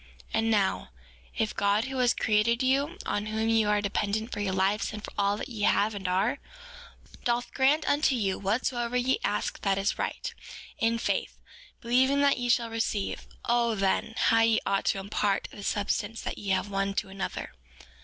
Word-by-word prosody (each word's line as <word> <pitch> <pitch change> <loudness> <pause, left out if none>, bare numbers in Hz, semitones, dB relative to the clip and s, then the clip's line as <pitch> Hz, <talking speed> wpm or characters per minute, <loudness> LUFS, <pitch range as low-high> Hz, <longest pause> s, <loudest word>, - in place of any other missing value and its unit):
4:21 - - -23 0.3
And 225 0 +1
now, 195 - +1 0.5
if 220 - -1
God, 200 +2 +2
who 265 0 -5
has 245 -1 +3
created 225 +3 +2
you, 280 +7 +1
on 205 +1 -1
whom 220 +1 -1
you 225 -2 +3
are 210 0 +2
dependent 210 +3 -1
for - - -4
your 200 -2 0
lives 190 +3 +1
and 210 -1 -7
for - - -10
all 200 0 +1
that - - -5
ye 225 -4 -6
have 210 +1 +3
and 195 -2 -4
are, 195 +9 +1 0.8
doth 240 0 -1
grant 285 +4 +3
unto 290 -2 +3
you 195 -5 -1
whatsoever 235 +4 -1
ye 255 - +1
ask - - -1
that 195 -1 +1
is 195 +1 -1
right, - - -3 0.5
in 230 0 +2
faith, - - -2 0.4
believing 260 +4 +3
that 280 -2 +3
ye 245 0 -2
shall 235 -1 +2
receive, 225 -3 -2 0.2
O 235 -1 +2
then, 195 +3 0
how 225 - +4
ye 225 -1 +4
ought 195 0 0
to - - +2
impart 200 0 -1
of - - -11
the - - -7
substance 205 +3 -1
that - - -5
ye 200 - -5
have 190 +1 +1
one 195 0 -1
to 195 - -2
another. 195 0 -5
220 Hz, 195 wpm, -28 LUFS, 200-240 Hz, 0.8 s, how